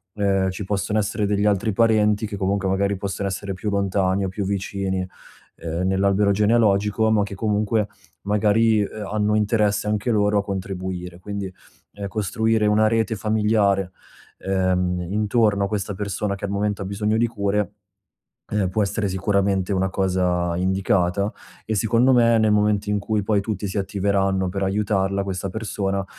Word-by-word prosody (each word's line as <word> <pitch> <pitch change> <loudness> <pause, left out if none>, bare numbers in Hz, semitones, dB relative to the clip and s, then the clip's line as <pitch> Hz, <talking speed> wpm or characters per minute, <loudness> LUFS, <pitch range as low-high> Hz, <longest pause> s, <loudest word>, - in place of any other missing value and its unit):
ehm, 95 -2 +1
ci 95 - -6
possono 105 +2 -1
essere 105 +1 -1
degli 105 0 +1
altri 105 +1 +1
parenti 110 -1 +3
che 100 -1 -6
comunque 100 0 0
magari 100 +1 +1
possono 100 +1 -3
essere 100 +1 -4
più 105 +3 -4
lontani 100 -1 +1
o - - -2
più 100 +1 -4
vicini, 95 -1 -2 0.5
ehm, 85 +3 -3
nell'albero 100 +1 +2
genealogico, 105 0 +2
ma 105 -2 +3
che 100 - -6
comunque 105 0 0 0.4
magari, 105 +1 +3
ehm, 105 +1 -4
hanno 105 0 +1
interesse 105 -1 +1
anche 105 +3 0
loro 105 -1 +2
a 100 - -1
contribuire. 95 -2 -5
Quindi, 100 0 -5 0.4
ehm, 100 -1 -5
costruire 110 +2 0
una 110 +1 +4
rete 110 0 +1
familiare, 105 -3 +1 0.5
ehm, 90 -2 0
intorno 105 0 +2
a - - -2
questa 100 -1 -3
persona 100 0 -2
che 100 - -13
al 100 - -4
momento 100 0 -1
ha - - -3
bisogno 105 +2 -1
di 120 +1 +2
cure, 105 -2 -1 0.8
ehm, 100 -3 +1
può 105 +3 0
essere 100 +1 -1
sicuramente 95 0 0
una 95 0 +1
cosa 90 -2 0
indicata. 95 +1 +1 0.3
E 110 - -2
secondo 115 +5 +3
me, 115 -2 +5
nel 110 -1 +3
momento 105 -1 +2
in 105 - +1
cui 105 +1 -1
poi 100 0 +1
tutti 105 -1 -3
si 95 - -4
attiveranno 95 -1 0
per 95 +1 -3
aiutarla 100 0 0
questa 95 0 -4
persona, 100 -2 -2
100 Hz, 165 wpm, -22 LUFS, 95-105 Hz, 0.8 s, me